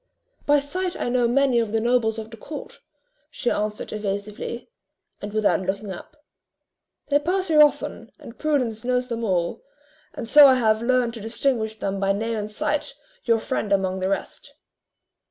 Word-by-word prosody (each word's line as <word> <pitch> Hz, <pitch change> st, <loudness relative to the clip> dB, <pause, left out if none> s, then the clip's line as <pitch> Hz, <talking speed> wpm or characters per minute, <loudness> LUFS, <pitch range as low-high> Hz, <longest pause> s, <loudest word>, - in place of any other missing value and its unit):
"By 290 Hz, 0 st, +5 dB
sight 360 Hz, +6 st, -3 dB
I -, -, -1 dB
know 245 Hz, -1 st, +2 dB
many 260 Hz, 0 st, +3 dB
of 225 Hz, -3 st, -1 dB
the 225 Hz, -, +1 dB
nobles 230 Hz, -1 st, +1 dB
of 220 Hz, 0 st, -7 dB
the -, -, -8 dB
court," 290 Hz, +7 st, -9 dB, 0.5 s
she 245 Hz, -, -2 dB
answered 210 Hz, 0 st, -3 dB
evasively, 210 Hz, -, -5 dB, 0.5 s
and 205 Hz, -, -5 dB
without 215 Hz, -2 st, +2 dB
looking 195 Hz, +2 st, -3 dB
up: 300 Hz, -, -10 dB, 0.9 s
"they 285 Hz, 0 st, +4 dB
pass 365 Hz, +4 st, -1 dB
here 305 Hz, -2 st, +6 dB
often, 295 Hz, -1 st, +1 dB
and 230 Hz, -, -13 dB
Prudence 255 Hz, -8 st, 0 dB
knows 250 Hz, 0 st, 0 dB
them 235 Hz, -1 st, -3 dB
all; 180 Hz, -5 st, -1 dB, 0.5 s
and 230 Hz, -, -5 dB
so 290 Hz, +3 st, +9 dB
I 260 Hz, -, +6 dB
have 220 Hz, -3 st, +2 dB
learned 245 Hz, -1 st, +1 dB
to 230 Hz, -, -8 dB
distinguish 225 Hz, 0 st, -1 dB
them 195 Hz, -2 st, -3 dB
by 195 Hz, 0 st, +2 dB
name 225 Hz, +3 st, -2 dB
and 210 Hz, 0 st, -4 dB
sight, 300 Hz, +5 st, -2 dB, 0.3 s
your 230 Hz, -1 st, +4 dB
friend 215 Hz, -2 st, -3 dB
among 190 Hz, -1 st, +1 dB
the 185 Hz, +1 st, -1 dB
rest." 195 Hz, -, -4 dB
230 Hz, 175 wpm, -24 LUFS, 210-270 Hz, 0.9 s, so